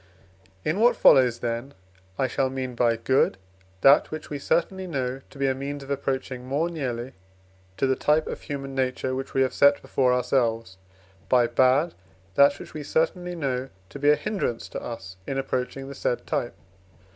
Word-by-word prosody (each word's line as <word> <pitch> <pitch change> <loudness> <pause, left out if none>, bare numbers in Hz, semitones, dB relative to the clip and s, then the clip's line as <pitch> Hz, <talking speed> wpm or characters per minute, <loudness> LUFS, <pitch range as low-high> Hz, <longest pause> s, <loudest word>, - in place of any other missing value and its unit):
In 160 +6 0
what 240 +2 +5
follows, 125 -4 +5
then, 120 +3 -3 0.4
I 135 - +1
shall 130 +1 0
mean 130 -1 -4
by, 120 -1 +2
"good" 115 -3 +2 0.4
that, 140 +2 +6
which 155 -1 -7
we 145 - -3
certainly 185 +5 0
know 130 -4 -3
to - - -15
be 140 - 0
a 130 - +2
means 140 +2 -5
of 135 - -8
approaching 135 -2 -2
more 145 +7 -1
nearly 130 -5 -4 0.6
to - - +1
the 130 0 +2
type 150 +3 +2
of - - -6
human 135 -1 -6
nature, 130 0 -1
which 135 +1 -5
we 135 - +4
have 130 - -1
set 140 0 +5
before 130 -2 +1
ourselves; 115 -5 0 0.5
by 125 -2 +5
"bad," 130 +7 +3 0.4
that 140 +5 +5
which - - -11
we 155 - -5
certainly 175 +4 -1
know 135 -4 -2 0.2
to 140 - -9
be 145 +1 +3
a 150 - +7
hindrance 150 - -3
to - - -6
us 95 -6 -7
in 135 - -2
approaching 135 0 -3
the 140 - -7
said 125 -2 -2
type. 120 - -2
135 Hz, 180 wpm, -25 LUFS, 125-145 Hz, 0.6 s, a